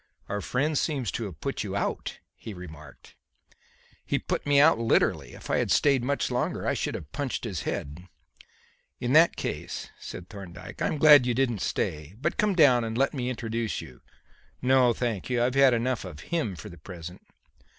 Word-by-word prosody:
"Our 105 0 -3
friend 145 +8 0
seems 140 -6 0
to 115 - -3
have 90 -7 -8
put - - -2
you - - -4
out," - - -2 0.2
he 110 - -9
remarked. 80 -6 -12 0.9
"He - - 0
put - - -3
me 145 -1 +5
out 150 -4 +6
literally. 115 -1 +1
If - - -7
I - - +3
had - - 0
stayed 135 -4 +3
much 140 +3 -1
longer - - -1
I - - +1
should - - -2
have 75 -2 -8
punched 140 -3 -3
his 95 - -3
head." 80 +6 -5 0.9
"In 120 +2 -1
that 165 +2 +6
case," - - -5
said 90 - -8
Thorndyke, 95 -3 -10
"I - - +2
am - - -2
glad 145 -4 +8
you 120 - +1
didn't 120 -5 0
stay. 75 +4 -2
But 140 - -1
come 210 -2 +2
down 135 -8 +6
and 115 0 -3
let 135 +2 +2
me 125 -3 -2
introduce 115 -2 -3
you." 65 - -11 0.6
"No, 130 -1 +4
thank 115 -4 -2
you. 120 -1 +1
I've 125 +1 +1
had 135 -1 +6
enough 120 +1 -1
of 90 -6 -9
him 155 - 0
for 105 +5 -9
the 85 -3 -13
present." 90 +2 -9
120 Hz, 190 wpm, -27 LUFS, 90-135 Hz, 0.9 s, glad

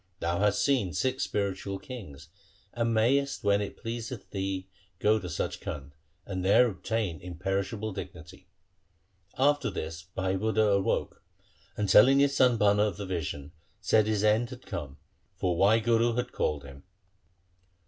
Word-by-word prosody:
Thou 85 +2 -1
hast 105 0 +2
seen 125 - +1
six 130 - -1
spiritual 100 -3 -2
kings, 90 - -10 0.4
and 115 -1 0
mayest 135 +5 +1
when 100 0 +3
it 100 - -5
pleaseth 115 -1 -6
thee 95 -1 -3 0.3
go 110 +4 +3
to 90 - -7
Sach 85 - -3
Khand, 70 -1 -6 0.3
and 95 -2 -4
there 100 +6 +5
obtain 100 -3 -3
imperishable 95 +4 -3
dignity.' 85 +1 -9 0.9
After 145 +1 +2
this 80 -4 -5
Bhai 95 +2 -2
Budha 110 0 +2
awoke, 100 -1 -1 0.6
and 105 - 0
telling 130 +8 +7
his 140 0 +3
son 125 -3 +4
Bhana 105 -1 +4
of 100 -5 -3
the 100 - -5
vision, 80 -5 -4 0.3
said 110 -1 +3
his 105 -1 0
end 110 +3 +3
had 125 0 -11
come, 70 -4 -6 0.4
for 90 -2 0
Wahguru 115 +4 +3
had 125 0 -2
called 75 -2 -1
him. 70 0 -12
100 Hz, 150 wpm, -28 LUFS, 90-115 Hz, 0.9 s, telling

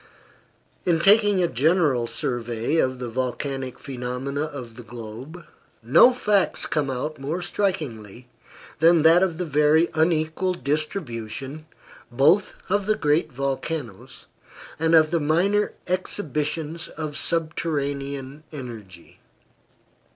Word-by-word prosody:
In 170 -2 +2
taking 205 0 +5
a - - +3
general 145 -4 +2
survey 120 +4 -2
of 130 -4 +1
the 125 -1 -5
volcanic 130 +2 -3
phenomena 130 +2 -4
of 125 -6 -8
the 125 - -9
globe, 120 +8 -9 0.4
no 155 - +7
facts 210 -6 +1
come 150 -3 -1
out 145 +4 -4
more 155 +6 -3
strikingly 125 - -3 0.5
than 165 0 +5
that 165 +2 +7
of 180 -4 +1
the 180 - -2
very 150 +2 +3
unequal 160 +3 +1
distribution, 140 - -4 0.4
both 155 +11 +3
of 205 +1 0
the 215 - +3
great 150 0 +1
volcanoes, 135 - -4 0.5
and 165 +1 +3
of 155 -1 +5
the 170 - +2
minor 180 +8 +1
exhibitions 160 -3 -2
of 155 -2 -6
subterranean 140 -4 -3
energy. 115 - -10
150 Hz, 115 wpm, -24 LUFS, 130-170 Hz, 0.5 s, no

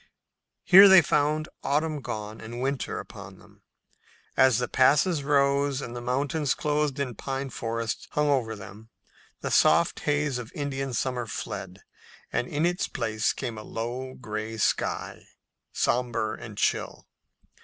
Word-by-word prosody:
Here 195 +1 +9
they 190 -3 +8
found 150 +2 +1
autumn 150 +1 0
gone 110 -2 -6
and 115 +2 -7
winter 135 0 -2
upon - - -9
them. - - -20 0.7
As 130 -4 +5
the 125 - -1
passes 145 +4 +3
rose 140 -1 +2
and 125 -3 -6
the 120 - -5
mountains, 140 +4 0
clothed 150 -2 -1
in 135 -3 -2
pine 135 +4 -4
forest, 115 -1 -3
hung 150 0 +1
over 125 -6 +1
them, 105 +2 -12 0.5
the - - -3
soft 170 +2 +4
haze 145 -3 0
of 120 -2 -8
Indian 135 -2 -3
summer 125 -2 -2
fled, - - -6 0.5
and 125 - 0
in 150 +3 0
its 175 +1 0
place 110 -3 -1
came 120 -5 -5
a - - -9
low, 125 +4 -5
gray 110 -2 -5
sky, 105 - -1 0.4
somber 120 -3 0
and 110 -2 -9
chill. - - -1
130 Hz, 145 wpm, -27 LUFS, 115-145 Hz, 0.7 s, Here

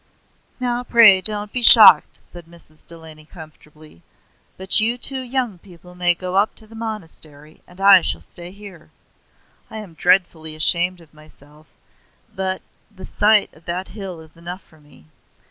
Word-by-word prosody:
"Now 245 -1 -4
pray 225 -6 +4
don't 210 +1 -1
be 250 - -2
shocked," 225 -2 +7
said 175 -2 -15
Mrs. 165 -2 -22
Delany 160 -2 -15
comfortably; 155 - -18 0.6
"but 190 +3 +5
you 230 +3 -2
two 265 +1 -6
young 245 -6 -5
people 180 -1 -19
may 175 -1 +1
go 185 +1 -6
up 205 +2 -1
to 220 - -3
the 220 - -20
monastery, 160 -9 -9
and 180 +1 -20
I 195 -1 +5
shall - - -4
stay 175 0 -14
here. 195 -4 -16 0.8
I 220 - -11
am 210 -6 -12
dreadfully 160 -2 -1
ashamed 175 +3 -2
of 160 -2 -23
myself, 155 0 -21 0.7
but 190 -1 -5 0.3
the 200 -3 -14
sight 210 0 0
of 160 +1 -24
that 180 +2 -7
hill 190 -6 -10
is 160 -1 -20
enough 175 +3 -11
for 160 - -26
me. 145 - -23
180 Hz, 160 wpm, -18 LUFS, 160-210 Hz, 0.8 s, shocked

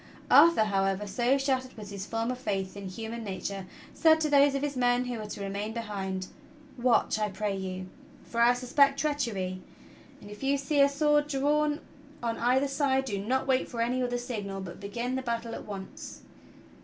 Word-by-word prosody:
Arthur, 335 -9 +7
however, 195 -1 0
so 240 +7 +1
shattered 260 -2 -1
was 205 -2 -8
his 200 0 -6
former 225 +2 -1
faith 200 -7 -3
in 200 -1 -6
human 225 +4 -6
nature, 195 -1 -5 0.3
said 320 -1 +5
to 305 -2 0
those 280 -1 +5
of 275 - -1
his 290 -1 -2
men 245 0 +2
who 245 -2 -4
were 215 - -5
to 205 - -7
remain 200 +2 -3
behind: 195 -5 -4 0.5
"Watch, 240 -3 +2
I 210 0 0
pray 205 +1 -2
you, 185 -1 -4 0.4
for 235 - -2
I 240 +1 +6
suspect 275 +3 +3
treachery; 230 -12 -1 0.6
and 205 - -12
if 210 - -10
you 275 +1 +2
see 280 +1 +1
a 280 - +6
sword 295 +1 +2
drawn 295 +2 +1 0.4
on 230 -1 -1
either 255 +4 +3
side, 275 -1 +1
do 200 -6 -2
not 260 +5 0
wait 265 -1 +1
for 235 - -6
any 245 +2 +1
other 245 -1 0
signal 210 -5 -4
but 190 -3 -8
begin 235 +5 -3
the 260 - -1
battle 235 -2 -3
at - - -7
once." 195 -2 -8
235 Hz, 190 wpm, -29 LUFS, 200-270 Hz, 0.6 s, Arthur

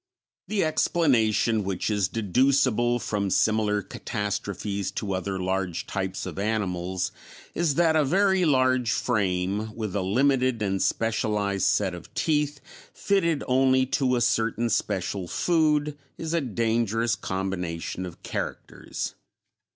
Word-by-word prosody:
The 215 -2 +1
explanation 120 -9 +2
which 95 +2 -2
is 100 -3 +1
deducible 120 +3 +2
from 105 -4 -2
similar 105 0 +2
catastrophes 100 -2 -3
to 100 -3 -3
other 95 +1 -2
large 95 -2 -2
types 95 -1 -3
of 95 0 -6
animals 95 -4 -1 0.4
is 165 -5 +1
that 165 -2 +3
a 155 - +4
very 190 +5 +3
large 130 -5 +3
frame, 100 -1 0
with 110 -4 -4
a 100 - +1
limited 125 +3 +2
and 95 -1 0
specialized 105 -4 0
set 100 -1 +1
of 90 -1 -10
teeth 150 -2 0 0.3
fitted 170 -7 +1
only 130 0 +3 0.2
to 125 -1 +3
a 120 - 0
certain 115 +1 +1
special 95 -1 -1
food, 150 - +1 0.2
is 160 0 -4
a 170 - +2
dangerous 115 -2 0
combination 95 -2 -3
of 90 -2 -9
characters. - - -5
110 Hz, 125 wpm, -26 LUFS, 95-135 Hz, 0.4 s, a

